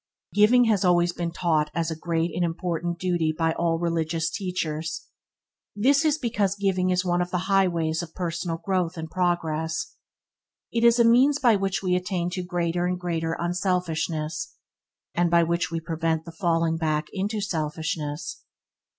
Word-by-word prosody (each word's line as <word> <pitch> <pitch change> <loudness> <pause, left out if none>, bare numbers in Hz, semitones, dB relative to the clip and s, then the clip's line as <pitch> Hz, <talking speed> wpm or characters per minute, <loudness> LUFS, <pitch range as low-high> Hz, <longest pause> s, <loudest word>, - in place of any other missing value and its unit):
Giving 220 +4 +6
has 215 -4 +2
always 175 -1 +3
been 170 -1 -2
taught 160 -3 0
as 165 0 0
a - - -2
great 165 +1 -1
and 175 - 0
important 170 0 -2
duty 175 -3 0
by 165 +1 0
all 165 -1 0
the 170 - -5
religious 165 -1 0
teachers. 165 -4 -3 0.7
This 275 +8 +3
is 310 -1 +2
because 210 -8 0
giving 190 -2 +1
is 185 0 +1
one 175 0 +1
of 175 - -2
the 180 - -1
highways 170 -5 +2
of 170 -2 -9
personal 170 -2 -2
growth 180 -1 -1
and 160 0 -6
progress. 165 -3 -1 0.8
It 230 - 0
is 235 0 +6
a 235 - +5
means 260 +5 +5
by 240 -5 +4
which 195 -1 -1
we 180 -1 +2
attain 180 -1 -1
to 185 - -3
greater 175 -1 -1
and 180 0 -2
greater 165 -2 -2
unselfishness, 175 - -2 0.6
and 175 0 +2
by 170 0 +5
which 170 +1 0
we 165 - -2
prevent 160 -1 -2
the 170 - -8
falling 165 -1 +1
back 155 -1 0
into 205 +2 -2
selfishness. 155 -4 -3
175 Hz, 170 wpm, -25 LUFS, 165-185 Hz, 0.8 s, Giving